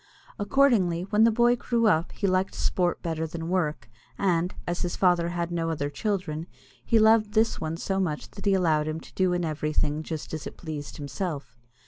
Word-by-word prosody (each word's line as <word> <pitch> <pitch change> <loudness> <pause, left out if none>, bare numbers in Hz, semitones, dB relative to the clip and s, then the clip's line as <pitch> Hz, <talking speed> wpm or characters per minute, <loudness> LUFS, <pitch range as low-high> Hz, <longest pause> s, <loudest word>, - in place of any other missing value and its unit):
Accordingly, 205 -7 +3
when 210 +3 +3
the 230 - +5
boy 240 +2 +4
grew 235 -1 0
up 170 -5 +3
he 205 - -3
liked 185 0 +1
sport 175 -1 0
better 160 -1 -2
than 165 +1 -5
work, 175 -5 -1 0.3
and, 180 -2 +1
as 175 0 -2
his 175 - -2
father 175 -2 +3
had 175 0 -3
no 165 -1 -1
other 145 -3 -2
children, 180 -5 -2 0.4
he 230 - +3
loved 220 -1 +4
this 220 +1 +2
one 160 0 -3
so 195 +3 -1
much 160 -6 -2
that 200 - -10
he 195 - +4
allowed 155 -5 +2
him 155 +1 -3
to - - -15
do 185 -1 +2
in 175 -1 0
everything 150 -1 -1
just 160 -1 -6
as 155 - -4
it - - -10
pleased 150 -3 -6
himself. 145 +1 -5
175 Hz, 195 wpm, -27 LUFS, 160-200 Hz, 0.4 s, the